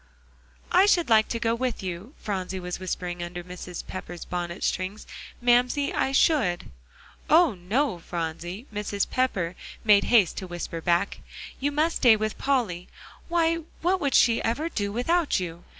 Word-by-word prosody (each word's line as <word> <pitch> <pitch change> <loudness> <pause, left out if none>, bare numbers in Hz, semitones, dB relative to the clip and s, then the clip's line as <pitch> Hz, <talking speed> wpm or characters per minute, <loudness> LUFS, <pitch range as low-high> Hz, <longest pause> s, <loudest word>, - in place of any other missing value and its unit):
"I 375 +3 +6
should 345 -8 +3
like 220 -1 +6
to 230 - -3
go 230 -1 +1
with 240 -3 -2
you," 185 - -6
Phronsie 190 -2 -4
was 180 0 -5
whispering 180 -1 -4
under 175 0 -5
Mrs. 180 0 -8
Pepper's 175 -2 -7
bonnet 175 +1 -4
strings, 185 +4 -2 0.4
"Mamsie, 245 +4 +3
I 265 - 0
should." 265 - +2 0.6
"Oh, 320 -3 +6
no, 195 +4 -1
Phronsie!" 175 +5 -5
Mrs. 205 -1 -1
Pepper 195 -10 0 0.3
made 210 -2 +5
haste 215 -7 +4
to 185 - -5
whisper 175 -1 -5
back. 175 +4 +1 0.4
"You 285 +2 0
must 310 +3 +1
stay 240 -4 +6
with 215 0 -3
Polly. 230 -11 0 0.4
Why, 330 -1 +2 0.3
what 370 +2 +2
would 280 -2 +1
she 230 -1 +5
ever 290 +9 -1
do 205 -8 -2
without 295 - +1
you? 170 -1 -6
210 Hz, 155 wpm, -26 LUFS, 180-265 Hz, 0.6 s, I